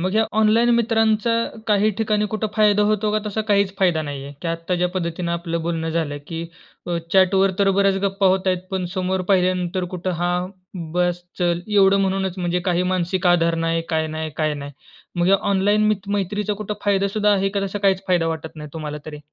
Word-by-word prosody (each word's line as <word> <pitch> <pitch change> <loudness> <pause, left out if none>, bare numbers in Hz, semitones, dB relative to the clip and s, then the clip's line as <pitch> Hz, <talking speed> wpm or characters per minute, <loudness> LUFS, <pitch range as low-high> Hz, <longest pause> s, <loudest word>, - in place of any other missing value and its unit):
मग 185 +2 0
ह्या 220 +1 +3
ऑनलाईन 225 +2 +4
मित्रांचा 225 -1 +2 0.4
काही 210 0 +3
ठिकाणी 210 -1 +1
कुठं 215 0 -1
फायदा 210 -1 +4
होतो 215 0 +1
का 215 - +2
तसा 210 +1 -2
काहीच 200 -1 +3
फायदा 175 -5 +2
नाही 140 -2 -5
आहे? 140 - -8
की 170 - -2
आत्ता 165 +2 -2
ज्या 180 0 +1
पद्धतीनं 170 -1 -3
आपलं 170 -1 -2
बोलणं 165 -1 -2
झालं 155 -3 -2
की 165 0 -5 0.4
अ, 175 -1 -1 0.2
चॅटवर 190 +1 +4
तर 195 -1 +4
बऱ्याच 195 -1 +3
गप्पा 195 0 +1
होत 190 0 +2
आहेत 185 -1 +2
पण 190 -1 -2
समोर 185 0 -1
पाहिल्यानंतर 185 -1 +1
कुठं 180 +1 -3
हां, 180 +1 0 0.4
बस 175 0 0 0.2
चल. 175 -1 +1
एवढं 200 -1 +4
म्हणूनच 190 -1 -1
म्हणजे 180 0 0
काही 175 +1 +1
मानसिक 185 +1 -1
आधार 170 -1 +3
नाही, 165 0 0
काय 160 -2 0
नाही, 160 0 -3
काय 155 -1 0
नाही. 145 0 -7 0.5
मग 180 +2 +3
ऑनलाईन 205 +2 +2
मि 215 - +4 0.2
मैत्रीचा 205 +2 -2
कुठं 210 +1 -4
फायदासुद्धा 205 +1 +2
आहे 195 -1 +2
का 200 - +1
तसा 205 +2 -4
काहीच 195 -1 +2
फायदा 175 -3 +2
वाटत 160 0 -4
नाही 150 -1 -8
तुम्हाला 150 -2 -5
तरी? 150 -1 -7
185 Hz, 195 wpm, -21 LUFS, 170-200 Hz, 0.5 s, ऑनलाईन